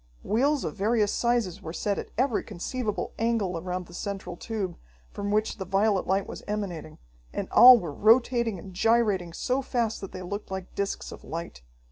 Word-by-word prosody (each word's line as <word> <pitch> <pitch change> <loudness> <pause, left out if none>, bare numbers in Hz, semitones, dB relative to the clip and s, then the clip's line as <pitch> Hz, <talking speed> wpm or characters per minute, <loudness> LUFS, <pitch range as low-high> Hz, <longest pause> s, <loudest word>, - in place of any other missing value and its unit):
Wheels 275 +6 +1
of - - -3
various 210 +1 +1
sizes 235 -6 0
were 160 - -6
set 200 +2 -1
at - - -7
every 255 -2 +2
conceivable 215 +3 -4
angle 225 -5 0
around 180 +2 -4
the 175 - -15
central 190 -1 -5
tube, 195 -2 -4 0.4
from 205 0 -4
which 215 +2 0
the 195 - -4
violet 195 +2 +1
light 195 +1 +1
was - - -8
emanating, 185 -7 -4 0.3
and - - -3
all 250 0 +10
were 165 -7 -5
rotating 235 - +3
and 190 +2 -10
gyrating 205 -4 +2
so 255 +10 -1
fast 235 -4 -1
that 195 - -7
they 185 - -7
looked 200 +4 -5
like 190 -1 -6
discs 200 0 -3
of - - -10
light. 165 - -6
205 Hz, 180 wpm, -27 LUFS, 185-230 Hz, 0.4 s, all